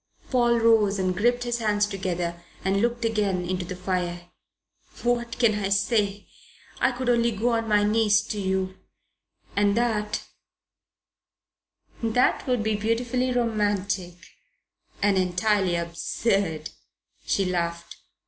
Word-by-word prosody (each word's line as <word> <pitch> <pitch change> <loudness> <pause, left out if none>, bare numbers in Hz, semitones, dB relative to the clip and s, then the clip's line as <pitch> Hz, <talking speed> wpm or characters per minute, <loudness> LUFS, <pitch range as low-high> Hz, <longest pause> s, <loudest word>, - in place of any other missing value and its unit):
Paul 240 -2 +3
rose 220 -3 +4
and 185 -1 0
gripped 245 +5 +2
his 240 0 -2
hands 210 -2 +2
together 180 -4 -3 0.2
and 195 +1 +2
looked 235 0 0
again 200 -5 0
into 185 0 -2
the 180 - -6
fire. 180 -1 -3 0.7
"What 240 -1 0
can 235 -3 +4
I 205 -2 -2
say? 200 0 +1 0.5
I - - +3
could 245 +1 -5
only 235 -1 +3
go 225 +2 0
on 230 -1 0
my 210 -1 +4
knees 210 0 +3
to 210 - -2
you 190 -1 -2 0.8
and 205 +1 +2
that 215 -3 0 1.3
" - - -33
"That 235 +4 +1
would 250 -3 +1
be 220 0 +1
beautifully 240 +4 0
romantic 205 -6 0 0.9
and 200 -2 +3
entirely 185 0 +1
absurd," 170 0 -1 0.5
she 195 - +1
laughed. 170 -2 -3
205 Hz, 130 wpm, -25 LUFS, 185-230 Hz, 1.3 s, rose